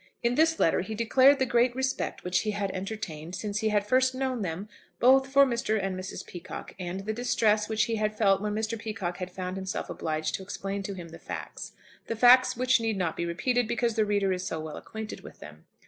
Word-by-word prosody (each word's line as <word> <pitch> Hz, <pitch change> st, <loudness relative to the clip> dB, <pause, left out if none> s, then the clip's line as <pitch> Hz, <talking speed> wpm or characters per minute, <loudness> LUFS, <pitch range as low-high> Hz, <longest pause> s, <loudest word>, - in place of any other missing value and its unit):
In 235 Hz, +1 st, +2 dB
this 320 Hz, +4 st, +3 dB
letter 165 Hz, -, +3 dB
he 220 Hz, +4 st, -5 dB
declared 260 Hz, +5 st, +5 dB
the 260 Hz, -, +1 dB
great 240 Hz, 0 st, +2 dB
respect 265 Hz, 0 st, -2 dB
which 180 Hz, 0 st, +1 dB
he 215 Hz, -, -2 dB
had 200 Hz, -2 st, -1 dB
entertained, 185 Hz, -4 st, -5 dB
since 205 Hz, +1 st, -3 dB
he 220 Hz, -1 st, +1 dB
had 205 Hz, -1 st, +1 dB
first 255 Hz, +3 st, +3 dB
known 260 Hz, -3 st, -1 dB
them, 185 Hz, +2 st, -4 dB, 0.3 s
both 265 Hz, +2 st, +5 dB
for 275 Hz, +1 st, +6 dB
Mr. 235 Hz, -4 st, 0 dB
and 195 Hz, -1 st, -2 dB
Mrs. 185 Hz, +1 st, -6 dB
Peacocke, 175 Hz, 0 st, -8 dB
and 180 Hz, +1 st, -4 dB
the 215 Hz, +2 st, -3 dB
distress 220 Hz, -3 st, +1 dB
which 215 Hz, -1 st, +2 dB
he 225 Hz, 0 st, -1 dB
had 215 Hz, 0 st, -1 dB
felt 195 Hz, -3 st, +3 dB
when 210 Hz, 0 st, -2 dB
Mr. 220 Hz, +1 st, -2 dB
Peacocke 205 Hz, -6 st, -4 dB
had 180 Hz, -1 st, -5 dB
found 185 Hz, 0 st, -5 dB
himself 190 Hz, -1 st, -4 dB
obliged 155 Hz, 0 st, -2 dB
to -, -, -2 dB
explain 195 Hz, +1 st, -4 dB
to 195 Hz, 0 st, -5 dB
him 175 Hz, -2 st, -8 dB
the -, -, -11 dB
facts, -, -, -7 dB, 0.3 s
the 230 Hz, -, -2 dB
facts 250 Hz, +2 st, +6 dB
which 255 Hz, 0 st, +3 dB
need 225 Hz, -2 st, -1 dB
not 175 Hz, -4 st, -1 dB
be 170 Hz, -, -2 dB
repeated, 245 Hz, +8 st, 0 dB
because 235 Hz, 0 st, 0 dB
the 220 Hz, -, +2 dB
reader 200 Hz, -2 st, +1 dB
is 180 Hz, 0 st, -3 dB
so 160 Hz, -, -3 dB
well 155 Hz, -1 st, -6 dB
acquainted 220 Hz, -1 st, -7 dB
with -, -, -12 dB
them. -, -, -12 dB
215 Hz, 225 wpm, -28 LUFS, 185-240 Hz, 0.3 s, for